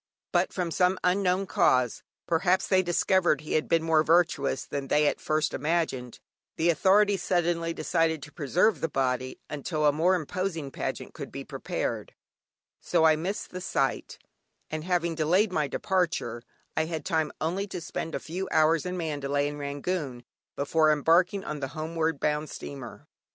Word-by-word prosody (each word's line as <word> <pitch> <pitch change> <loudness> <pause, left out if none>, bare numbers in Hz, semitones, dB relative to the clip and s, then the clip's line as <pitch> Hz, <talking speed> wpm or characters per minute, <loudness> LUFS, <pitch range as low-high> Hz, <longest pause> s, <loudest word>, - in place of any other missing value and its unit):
But - - +2
from 175 -3 -2
some 180 +2 +2
unknown 185 +1 +2
cause 130 - +2 0.2
(perhaps 180 +3 +2
they 190 -1 +3
discovered 175 -3 +2
he 155 - -5
had 155 - +1
been 165 -1 +3
more 160 -1 +4
virtuous 160 -4 +2
than 140 -1 -4
they 150 +2 +3
at - - 0
first 155 0 0
imagined) 150 -5 -1 0.4
the 170 +2 +3
authorities 200 +3 +3
suddenly 170 -2 0
decided 160 -1 0
to 150 - -10
preserve 175 +9 +1
the 165 - 0
body 130 -2 -1
until 150 +1 -2
a 145 - +6
more 170 +6 +3
imposing 165 -3 -3
pageant - - -4
could - - -8
be - - -6
prepared, - - -4 0.6
so - - +1
I 160 -1 +6
missed 180 +6 -4
the 185 - -6
sight; - - -1 0.5
and 155 0 -3
having 170 -1 0
delayed 175 +6 +2
my 155 -4 0
departure, 170 -9 -1 0.3
I 160 - +1
had 160 -1 -5
time 160 -4 0
only 185 +6 -1
to 185 - -5
spend 165 0 -5
a - - -2
few 185 +4 -5
hours 160 +1 +3
in 180 0 -3
Mandalay 145 -3 -1
and 145 0 -5
Rangoon 140 -2 -3 0.3
before 155 +2 +3
embarking 175 +6 +3
on 150 -1 -5
the 135 - -3
homeward 160 -1 -1
bound 150 0 0
steamer. 130 -4 -8
160 Hz, 165 wpm, -27 LUFS, 150-180 Hz, 0.6 s, a